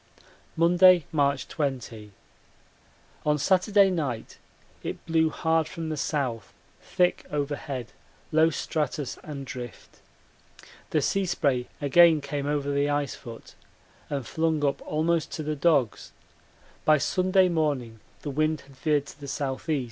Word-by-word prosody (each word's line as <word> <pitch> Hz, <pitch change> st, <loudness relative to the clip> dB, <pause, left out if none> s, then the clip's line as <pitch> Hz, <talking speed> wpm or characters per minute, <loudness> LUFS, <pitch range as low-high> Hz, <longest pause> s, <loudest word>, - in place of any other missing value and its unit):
Monday, 175 Hz, 0 st, +6 dB
March 140 Hz, -3 st, +1 dB
20. 120 Hz, -7 st, -4 dB, 1.1 s
On 150 Hz, 0 st, +2 dB
Saturday 195 Hz, +5 st, +4 dB
night 140 Hz, -10 st, -3 dB, 0.4 s
it -, -, -6 dB
blew 160 Hz, -1 st, +2 dB
hard 160 Hz, 0 st, +1 dB
from 165 Hz, -1 st, -5 dB
the 155 Hz, -, -2 dB
south, 130 Hz, -8 st, -2 dB, 0.3 s
thick 180 Hz, 0 st, +1 dB
overhead, 140 Hz, -4 st, -3 dB, 0.4 s
low 160 Hz, +1 st, +5 dB
stratus 150 Hz, -4 st, -3 dB
and 140 Hz, -3 st, -7 dB
drift. 125 Hz, -3 st, -9 dB, 0.9 s
The -, -, +1 dB
sea 195 Hz, -1 st, +1 dB
spray 140 Hz, -8 st, 0 dB
again 160 Hz, +3 st, +6 dB
came 145 Hz, 0 st, -4 dB
over 145 Hz, -1 st, -1 dB
the 140 Hz, +1 st, +1 dB
ice 145 Hz, -1 st, 0 dB
foot 115 Hz, -3 st, -11 dB, 0.6 s
and 140 Hz, -4 st, -3 dB
flung 160 Hz, 0 st, 0 dB
up 140 Hz, -, 0 dB
almost 160 Hz, +1 st, 0 dB
to 155 Hz, -, -4 dB
the 155 Hz, 0 st, -2 dB
dogs; 140 Hz, -7 st, +1 dB, 0.7 s
by 155 Hz, 0 st, +5 dB
Sunday 185 Hz, +5 st, +3 dB
morning 145 Hz, -9 st, -1 dB, 0.2 s
the 145 Hz, -, -3 dB
wind 155 Hz, +2 st, 0 dB
had 135 Hz, 0 st, -18 dB
veered 150 Hz, -2 st, +1 dB
to 140 Hz, -, -13 dB
the 145 Hz, -, -8 dB
S.E. 140 Hz, +2 st, -2 dB
150 Hz, 135 wpm, -26 LUFS, 140-160 Hz, 1.1 s, Monday